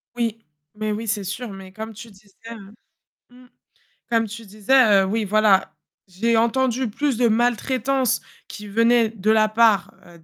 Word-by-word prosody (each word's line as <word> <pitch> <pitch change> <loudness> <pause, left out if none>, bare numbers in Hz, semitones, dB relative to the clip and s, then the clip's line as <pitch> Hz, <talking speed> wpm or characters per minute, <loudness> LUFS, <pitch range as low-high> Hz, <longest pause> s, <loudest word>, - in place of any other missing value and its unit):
Oui, 230 -2 -3 0.3
mais 215 0 -3
oui, 225 +2 -5
c'est 205 -2 -2
sûr, 220 +5 -5
mais 190 -1 -11
comme 220 +2 -7
tu 230 +2 -11
disais, 200 0 -21 0.2
hem, 215 -3 -10 0.6
mmh. 250 +1 -18 0.6
Comme 230 -1 +1
tu 225 +2 -9
disais, 215 +1 +3
heu, - - -1
oui, 215 +3 -1
voilà, 210 -1 +2 0.3
j'ai 225 +6 -1
entendu 250 +1 0
plus 275 +2 -2
de 245 - +3
maltraitances 245 +2 0 0.3
qui 210 -1 -10
venaient 230 +2 +2
de 215 -1 -3
la 215 -1 +3
part, 220 -2 +2
heu, 170 -1 -17
220 Hz, 165 wpm, -22 LUFS, 205-235 Hz, 0.6 s, disais